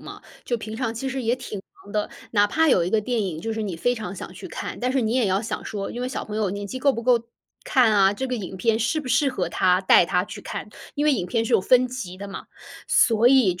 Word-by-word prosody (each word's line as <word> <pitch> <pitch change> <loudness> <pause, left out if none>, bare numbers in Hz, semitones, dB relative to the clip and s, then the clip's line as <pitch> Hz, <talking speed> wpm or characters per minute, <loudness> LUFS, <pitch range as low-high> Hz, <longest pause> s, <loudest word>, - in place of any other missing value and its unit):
嘛， - - -10 0.2
就 240 - -1
平 220 0 -7
常 230 -2 -2
其 265 +4 -3
实 265 0 -3
也 235 0 +1
挺 215 -5 -7 0.2
忙 205 - -13
的， 210 -1 -1 0.2
哪 205 -2 +4
怕 320 +9 +2
有 180 -10 +4
一 175 - -2
个 220 - +3
电 235 +2 -1
影， 180 -6 -3
就 225 +5 -3
是 220 - -3
你 190 -5 -4
非 245 +9 +1
常 215 -5 -6
想 - - -8
去 - - -9
看， - - -6
但 250 +1 -1
是 270 - +2
你 225 -1 0
也 250 -4 +2
要 190 +2 +1
想 230 - -4
说， 200 -2 -4
因 240 - -6
为 250 - -2
小 260 - -4
朋 210 - -6
友 215 -2 +1
年 200 +1 -5
纪 230 +6 -5
够 275 +1 +3
不 230 - -5
够 240 -1 +4 0.4
看 250 -5 +4
啊， 195 -1 +5
这 265 +5 -4
个 250 - -1
影 195 -3 -6
片 225 +2 +1
适 240 +7 0
不 275 - -8
适 255 +4 +3
合 260 - -2
他， 180 0 +2
带 185 -2 +5
他 180 +1 +1
去 - - -9
看。 - - -6 0.3
因 290 - 0
为 300 - +4
影 190 -8 -1
片 225 +3 0
是 - - -3
有 - - +5
分 255 +5 +4
级 240 -8 -6
的 200 +1 -8
嘛。 195 - -8 0.4
所 230 -1 +4
以 250 -8 +5
就 - - -11
225 Hz, 310 characters per minute, -24 LUFS, 200-255 Hz, 0.4 s, 啊